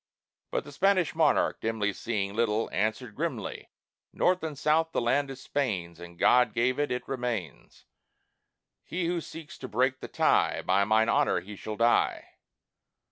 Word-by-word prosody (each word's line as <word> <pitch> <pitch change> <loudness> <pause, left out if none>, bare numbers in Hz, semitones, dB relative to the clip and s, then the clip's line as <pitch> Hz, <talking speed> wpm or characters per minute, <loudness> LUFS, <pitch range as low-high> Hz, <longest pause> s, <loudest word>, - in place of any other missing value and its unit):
But - - -2
the - - -11
Spanish 185 -7 +2
monarch, 160 -2 +2
dimly 110 -2 -1
Seeing 100 -2 -3
little, 115 -1 0
answered 110 +3 -1
grimly: - - -4 0.4
"North 180 0 +2
and 155 -3 -5
South 160 +3 +1
the - - +1
land 135 +4 +1
is 135 -1 -8
Spain's; 90 - -2
As 85 0 -11
God 125 +3 +4
gave 130 +3 +1
it, 145 - 0
it 125 - -3
remains. 120 - -5 1.0
He 175 +1 -3
who 170 0 -1
seeks 160 0 -10
to 130 - -6
break 130 +3 +1
the - - -7
tie, - - +2
By 100 +2 +3
mine 110 +1 +3
honor, - - +2
he 105 +2 -10
shall 105 +2 -6
die!" 115 +2 +2
120 Hz, 160 wpm, -28 LUFS, 105-145 Hz, 1.0 s, God